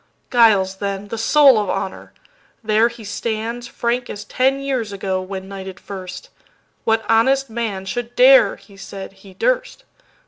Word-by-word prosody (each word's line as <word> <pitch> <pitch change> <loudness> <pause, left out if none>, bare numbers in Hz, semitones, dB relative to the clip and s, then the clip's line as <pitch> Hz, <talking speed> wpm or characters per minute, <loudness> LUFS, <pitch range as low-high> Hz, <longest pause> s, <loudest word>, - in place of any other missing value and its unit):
Giles 205 -6 +4
then, 200 0 -4
the 230 - -4
soul 275 0 +5
of 205 -3 -2
honor—there 220 - -2
he 235 -1 -10
standsFrank 235 +3 -3
as 205 - -6
ten 265 +4 +1
years 260 -6 -2
ago 190 -1 -2
when 190 0 -7
knighted 190 -1 -8
first. 185 -2 -9 0.6
What 225 0 +1
honest 265 +3 +2
man 220 -5 -3
should 240 +4 -5
dare 250 -4 +6
(he 200 -2 -19
said) 195 -1 -9
he 195 -1 -17
durst. - - -1
220 Hz, 140 wpm, -20 LUFS, 195-245 Hz, 0.6 s, dare